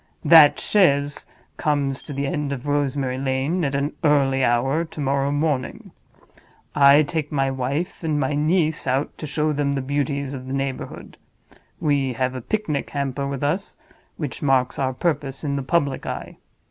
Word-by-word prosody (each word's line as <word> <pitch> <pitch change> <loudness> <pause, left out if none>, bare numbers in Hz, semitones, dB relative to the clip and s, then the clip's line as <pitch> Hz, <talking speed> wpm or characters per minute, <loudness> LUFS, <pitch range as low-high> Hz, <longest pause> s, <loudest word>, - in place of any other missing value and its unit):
That 160 -3 +8
chaise 145 -8 +2 0.3
comes 140 -3 0
to - - -10
the 140 0 -2
end 145 +1 -2
of 135 -1 -5
Rosemary 140 -3 -1
Lane 135 +6 -1
at 140 -2 -1
an 140 +2 -1
early 135 -3 +3
hour 135 +7 +2
to 160 -2 -10
morrow 140 0 0
morning. 145 -3 -2 0.8
I 145 +1 +6
take 150 0 -3
my 135 -2 +1
wife 140 +9 -3
and 155 -2 0
my 135 0 0
niece 155 0 +1
out 135 +3 0
to 155 - -5
show 150 +1 0
them 145 -1 0
the 135 - -1
beauties 140 0 -2
of 130 -1 -7
the 130 - -4
neighborhood. 135 -1 -5 0.6
We 140 -4 +1
have 130 +1 -1
a 130 - -5
picnic 155 - -2
hamper 140 -1 -2
with 140 0 -4
us, 165 +8 -2 0.4
which 150 -5 -5
marks 130 -3 +1
our 130 -1 0
purpose 140 -2 -2
in 140 -2 -1
the 140 - -1
public 140 -1 0
eye. - - -6
140 Hz, 170 wpm, -22 LUFS, 135-150 Hz, 0.8 s, That